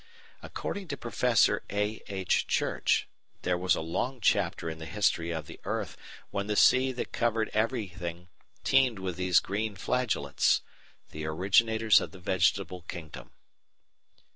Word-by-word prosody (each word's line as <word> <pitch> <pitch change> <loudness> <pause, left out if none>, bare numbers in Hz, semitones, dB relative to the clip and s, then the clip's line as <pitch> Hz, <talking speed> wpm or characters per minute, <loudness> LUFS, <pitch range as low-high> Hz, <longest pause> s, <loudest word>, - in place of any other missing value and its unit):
According 200 -2 -5
to 140 - -4
Prof. 120 -1 +2
A. 105 +2 -1
H. 95 -2 0
Church - - +1 0.4
there 90 - +1
was 90 +1 +2
a - - -3
long 105 +11 -2
chapter 90 -5 +1
in 80 -1 -5
the 80 - -7
history 100 -5 +1
of 80 -3 -3
the - - -11
earth - - -3 0.4
when 100 0 -2
the 105 - -1
sea 130 +4 +5
that 125 - -5
covered 115 -2 0
everything 95 -7 -2 0.4
teemed 130 -4 +3
with 95 -2 -4
these 90 0 +4
green 105 +2 -3
flagellates 100 - +1 0.5
the 75 0 -6
originators 105 +5 +4
of - - -6
the 95 - -11
Vegetable 90 0 +1
Kingdom. 80 -3 -8
100 Hz, 140 wpm, -29 LUFS, 90-115 Hz, 0.5 s, sea